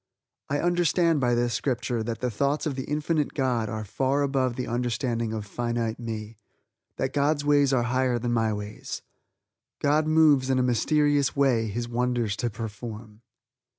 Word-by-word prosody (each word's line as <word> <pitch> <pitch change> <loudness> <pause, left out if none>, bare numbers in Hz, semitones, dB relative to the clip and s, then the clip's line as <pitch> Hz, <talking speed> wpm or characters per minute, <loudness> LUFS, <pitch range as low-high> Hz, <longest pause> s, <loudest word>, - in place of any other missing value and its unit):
I 145 +1 0
understand 175 -2 +2
by 120 -2 +2
this 120 0 +1
Scripture 120 -3 -1
that 115 +1 -4
the 125 -1 0
thoughts 140 +8 0
of 150 - -1
the 130 0 -4
Infinite 150 0 -1
God 125 -6 0
are 110 0 -4
far 135 +7 0
above 130 -3 0
the 125 - -3
understanding 120 -1 -1
of 110 -2 -4
finite 120 +1 -2
me; 110 -2 -6 0.6
that 130 0 -2
God's 145 +1 +1
ways 145 -2 +4
are 125 -3 +2
higher 125 0 +1
than 120 0 -1
my 115 -1 +2
ways. 105 0 -6 0.7
"God 150 +2 +2
moves 155 -4 +4
in 130 - +2
a 130 - +2
mysterious 145 +3 +2
way 130 -5 +2
His 120 +3 -3
wonders 120 -3 0
to 120 - -1
perform." 110 0 -8
125 Hz, 165 wpm, -26 LUFS, 115-140 Hz, 0.7 s, ways